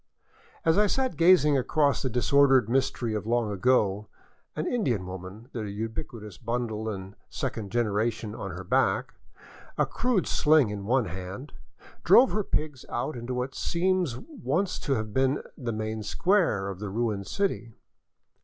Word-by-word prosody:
As 165 +4 +4
I 210 - +4
sat 260 +4 0
gazing 165 -5 +5
across 145 +2 +1
the 130 - -1
disordered 130 +1 +4
mystery 120 -2 0
of 105 0 -3
long 115 -2 +1
ago, 105 -1 +2 0.5
an 155 - -2
In 240 +1 0
dian 110 - 0
woman, 95 +6 -9
the 110 -3 -4
ubiquitous 105 -1 -6
bundle 115 -2 -2
and 95 -1 -7
second 100 -3 -4
generation 110 -1 0
on - - -6
her - - -7
back, - - +1 0.6
a - - +3
crude 240 -8 0
sling 150 -7 +3
in 100 -1 -5
one 125 +2 +2
hand, 95 - -7 0.5
drove 255 +2 +6
her 210 - 0
pigs 150 -7 -3
out 125 +5 -2
into 120 +1 -4
what 125 +2 -3
seems 175 -6 0
once 190 - -2
to 140 - -1
have 110 -2 -4
been 135 +2 +1
the 120 -3 -4
main 110 0 -3
square 135 - +1
of 95 -2 -6
the 105 -1 -4
ruined 105 -2 -2
city. 120 - -2
120 Hz, 155 wpm, -27 LUFS, 105-150 Hz, 0.6 s, drove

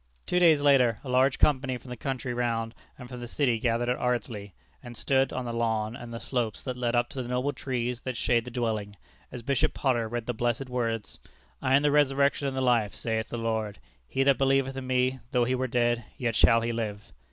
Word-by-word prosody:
Two 180 - +1
days 160 -4 +5
later 130 -6 +4
a 135 - -7
large 130 +1 +3
company 130 -3 +2
from 125 +1 -12
the - - -4
country 130 0 -3
round 115 -2 -1 0.2
and 125 - -10
from 125 0 -8
the 120 - -6
city 120 -3 +1
gathered 120 +1 0
at 125 - 0
Ardsley, 110 -5 -2 0.3
and 120 -1 -10
stood 135 +1 +2
on 130 -1 -3
the 120 - -4
lawn 110 -1 -1
and 120 -1 -9
the 115 - -5
slopes 120 -5 -3
that 130 -2 -4
lead 120 -1 -1
up 120 - +2
to 130 - -5
the 120 - -6
noble 125 +3 0
trees 125 -2 -3
that 130 -2 -4
shade 120 0 +2
the 125 - -8
dwelling, 110 -4 -2 0.4
as 125 -2 -7
Bishop 135 +1 +1
Potter 120 -4 +1
read 120 0 -4
the 125 - -2
blessed 120 +3 -1
words, 115 -3 -2 0.4
"I 130 - +3
am 140 - +3
the 145 - +3
Resurrection 140 -1 +3
and 135 -1 -3
the - - 0
Life, 120 -5 +2
saith 110 -1 -2
the 120 - -4
Lord: 110 -3 -2 0.3
he 135 - 0
that 135 -1 +3
believeth 135 0 +2
in 135 -1 -5
Me, 130 0 +1
though 125 -3 +2
he 125 - 0
were 130 0 0
dead, 120 -1 +1
yet 115 -3 -1
shall 115 +1 +5
he 115 +1 -1
live." 110 -3 -5
125 Hz, 230 wpm, -28 LUFS, 115-130 Hz, 0.4 s, days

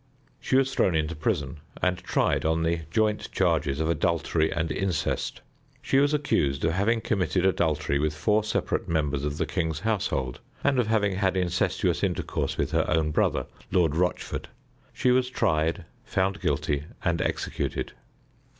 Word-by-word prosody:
She - - 0
was 135 0 +3
thrown 90 -9 +2
into 80 +2 0
prison, 75 -2 -2 0.2
and 90 0 +1
tried 95 - +1
on 80 +1 +1
the 80 0 0
joint 105 +3 0
charges 80 -6 +1
of 80 - 0
adultery 85 -1 +1
and 80 -1 -1
incest. 95 -4 -1 0.4
She 135 - +2
was 145 +1 +3
accused 80 - +1
of 80 - +2
having 105 +6 +1
committed 95 -3 0
adultery 75 -6 +1
with 75 +1 0
four 105 +7 +2
separate 110 - -1
members 75 -4 0
of 75 0 -2
the - - 0
king's 80 -4 -2
household, 90 - -1 0.2
and 140 -2 +3
of 120 - +2
having 105 -4 +1
had 95 -1 +1
incestuous 90 -1 0
intercourse - - -1
with - - -1
her - - +1
own 80 -1 +2
brother, - - +1 0.3
Lord 85 -5 +2
Rochford. 90 +2 -1 0.4
She 125 - +1
was 125 0 +3
tried, 80 -5 0 0.2
found 95 +1 -1
guilty, 75 0 0 0.2
and - - +1
executed. - - -2
85 Hz, 160 wpm, -26 LUFS, 75-100 Hz, 0.4 s, was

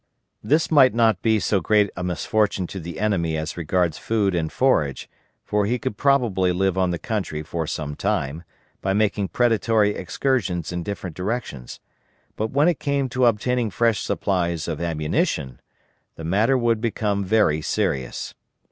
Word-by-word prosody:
This 155 +3 +2
might 135 -6 +6
not 110 -5 +3
be 110 -1 +3
so 100 0 +1
great 105 +3 +2
a 90 - -4
misfortune 95 +2 0
to 95 - -7
the 85 -1 -7
enemy 85 -7 0
as 80 0 -4
regards 85 -1 0
food 105 -4 0
and 80 -2 -1
forage; 80 - +1 0.4
for 105 -1 0
he 120 +3 +1
could 105 - -4
probably 115 -9 +2
live 95 +1 +1
on 95 -1 +1
the 85 - -1
country 95 -8 -3
for 80 0 -4
some 75 -2 -4
time, 75 +2 -2 0.4
by 95 - 0
making 105 -1 +1
predatory 115 -2 +2
excursions 90 - -1
in 90 0 -3
different 95 -3 -5
directions, 90 - -4 0.6
but 110 +1 -2
when 145 +6 +3
it 175 -4 +1
came 140 -2 0
to 125 0 +2
obtaining 120 +1 +1
fresh 115 +2 +1
supplies 85 -4 -1
of 80 -2 -4
ammunition, 75 -5 -1 0.5
the 80 - -9
matter 105 +10 +2
would 115 -3 +1
become 105 -3 -1
very 95 -6 +2
serious. 65 -4 -2
100 Hz, 160 wpm, -23 LUFS, 85-115 Hz, 0.6 s, might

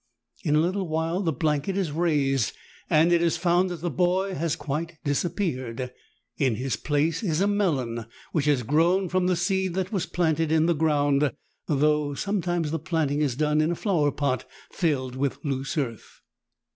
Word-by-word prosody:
In 150 -4 +2
a - - +5
little 185 +3 -1
while 165 +3 -1
the 170 -5 +1
blanket 150 +5 0
is 185 -6 0
raised, 145 - +1 0.4
and 160 +3 +4
it 170 - +4
is 170 0 +2
found 175 +1 +2
that 175 -3 -6
the 175 -1 -2
boy 185 +6 +1
has 165 -1 -1
quite 160 +2 -4
disappeared; 130 - -2 0.5
in 130 -5 +2
his 130 +3 -2
place 150 +2 0
is 170 -7 0
a 195 - +3
melon, 135 - 0 0.2
which 150 -4 0
has 145 -4 +2
grown 170 - +2
from 185 +1 +1
the 180 - +2
seed 190 +1 0
that 190 0 -2
was 195 -5 -1
planted 160 -2 0
in 160 0 +4
the 170 - +3
ground, 145 -3 +2 0.4
though 150 0 +2
some 200 +5 -1
times 175 -3 -1
the 165 - -1
planting 150 -3 0
is 140 -5 +1
done 150 +2 +2
in 155 - +1
a 175 - 0
flower 160 -7 +1
pot 140 -4 -1 0.3
filled 135 -8 -1
with 135 0 -1
loose 135 +2 -2
earth. 120 -7 -4
160 Hz, 185 wpm, -26 LUFS, 145-175 Hz, 0.5 s, a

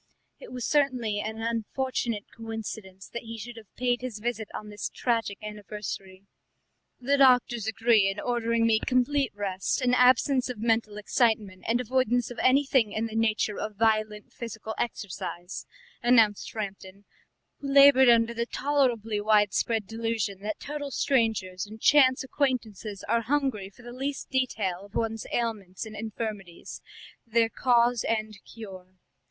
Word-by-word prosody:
It - - -11
was 250 -2 -4
certainly 255 -8 +1
an 220 +1 -4
unfortunate 230 -1 -2
coincidence 220 -4 -7
that 235 - -5
he 230 0 -8
should 235 +2 -8
have 220 -3 -13
paid 245 -1 0
his 250 -4 -5
visit 225 0 -3
on 210 - -7
this 205 -1 -4
tragic 230 -5 -1
anniversary. 205 -2 -7 0.7
"The 275 +3 +1
doctors 250 -4 +4
agree 220 -2 +3
in 195 - -4
ordering 230 -1 0
me 225 -1 +4
complete 260 +1 +1
rest, 195 +1 -1
an 250 -2 +1
absence 255 +1 +4
of 250 - -4
mental 225 -1 0
excitement, 210 -3 0
and 235 +2 +2
avoidance 245 -1 +1
of 245 - -8
anything 265 -4 +3
in 220 +1 -1
the 220 -1 -6
nature 220 -2 +1
of 215 -1 -4
violent 215 -1 0
physical 220 -2 -6
exercise," 185 -5 -5 0.3
announced 230 -4 +3
Framton, 200 -2 -7 0.6
who 280 - -6
laboured 275 -2 +8
under 230 0 +4
the 235 0 -2
tolerably 240 -8 0
widespread 210 +1 +2
delusion 225 -3 -2
that 210 +1 -4
total 290 -1 -5
strangers 220 -8 0
and 220 +1 -11
chance 260 0 +5
acquaintances 230 -7 -2
are 230 +2 +1
hungry 250 -6 -1
for 225 +5 -18
the 240 0 -9
least 275 +2 -4
detail 210 -8 -1
of 200 - -15
one's 225 -1 -2
ailments 215 -5 -3
and 215 -1 -9
infirmities, 210 -4 -6 0.4
their 230 0 +2
cause 240 -1 +2
and 215 -2 -2
cure. 185 -5 -11
225 Hz, 145 wpm, -27 LUFS, 210-245 Hz, 0.7 s, laboured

